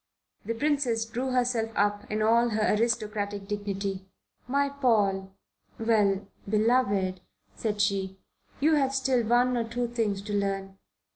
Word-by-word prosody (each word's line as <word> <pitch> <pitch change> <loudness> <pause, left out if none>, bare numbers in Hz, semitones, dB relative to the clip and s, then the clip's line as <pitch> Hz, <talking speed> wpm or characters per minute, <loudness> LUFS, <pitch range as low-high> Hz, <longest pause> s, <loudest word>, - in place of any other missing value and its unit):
The 230 +2 -2
Princess 255 -4 +1
drew 245 +4 -3
herself 245 -3 +1
up 205 0 0
in 215 0 0
all 235 +2 +4
her 215 -1 +1
aristocratic 210 -3 -1
dignity. 195 -2 -3 0.4
"My 280 +2 +2
Paul 210 -9 +1 0.5
well 205 -4 +2 0.2
beloved," 205 -4 +2 0.3
said 210 -2 -3
she, 195 -2 0 0.4
"you 310 +3 +3
have 275 -3 +2
still 260 -2 +2
one 245 +2 +3
or 235 - +1
two 240 +2 -2
things 220 -4 -1
to 210 0 -5
learn. 195 -1 -2
220 Hz, 135 wpm, -28 LUFS, 200-245 Hz, 0.5 s, all